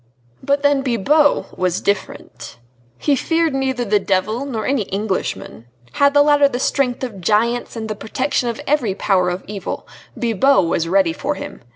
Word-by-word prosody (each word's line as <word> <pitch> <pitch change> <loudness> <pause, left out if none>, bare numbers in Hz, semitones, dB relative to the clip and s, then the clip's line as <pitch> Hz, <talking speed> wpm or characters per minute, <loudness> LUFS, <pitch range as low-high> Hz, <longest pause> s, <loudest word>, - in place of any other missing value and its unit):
But 280 +1 0
then 285 -1 +3
Bibot 280 +4 +2
was 180 -1 0
different! 125 - -4 0.4
He 290 - +1
feared 325 +2 0
neither 265 -2 -1
the 210 -1 +2
devil, 205 +7 -1
nor 225 -5 -3
any 275 -3 +1
Englishman. 195 - -4 0.2
Had 280 - +2
the 290 - +7
latter 290 -1 +5
the 245 - -3
strength 260 -2 0
of 215 -7 -5
giants 230 +7 0
and 220 -1 -5
the 215 - -3
protection 245 +4 -2
of 235 - -5
every 255 -10 0
power 185 -3 +1
of 180 +1 -4
evil, 200 -1 -6 0.3
Bibot 240 +1 +3
was 165 0 0
ready 185 -2 +2
for 285 - -3
him. 290 0 -8
235 Hz, 170 wpm, -19 LUFS, 195-280 Hz, 0.4 s, the